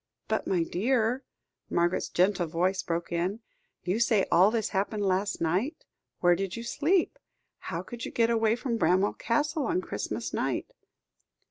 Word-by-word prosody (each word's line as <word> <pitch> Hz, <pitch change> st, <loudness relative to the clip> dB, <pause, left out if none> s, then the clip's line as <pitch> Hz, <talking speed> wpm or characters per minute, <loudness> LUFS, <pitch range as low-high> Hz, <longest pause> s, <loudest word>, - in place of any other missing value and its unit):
"But, -, -, -1 dB
my 180 Hz, -3 st, +2 dB
dear," 235 Hz, +7 st, 0 dB, 0.5 s
Margaret's 175 Hz, +1 st, +1 dB
gentle 180 Hz, -1 st, +2 dB
voice 180 Hz, +4 st, 0 dB
broke 170 Hz, -2 st, -3 dB
in, 180 Hz, +6 st, -1 dB, 0.4 s
"you 185 Hz, +5 st, 0 dB
say 225 Hz, -4 st, +3 dB
all 185 Hz, +4 st, +6 dB
this 220 Hz, -1 st, -1 dB
happened 205 Hz, +1 st, -1 dB
last 195 Hz, +1 st, 0 dB
night. 190 Hz, -, -1 dB, 0.4 s
Where 175 Hz, -1 st, +5 dB
did 195 Hz, +1 st, -3 dB
you 230 Hz, -, -5 dB
sleep? 325 Hz, +9 st, +1 dB, 0.5 s
How -, -, -3 dB
could 240 Hz, -1 st, -8 dB
you -, -, -3 dB
get 230 Hz, 0 st, +2 dB
away 225 Hz, -1 st, +3 dB
from 245 Hz, -1 st, -2 dB
Bramwell 185 Hz, +4 st, +3 dB
Castle, 295 Hz, +5 st, 0 dB
on 360 Hz, -, +1 dB
Christmas -, -, -4 dB
night?" -, -, -2 dB
205 Hz, 155 wpm, -28 LUFS, 180-235 Hz, 0.5 s, all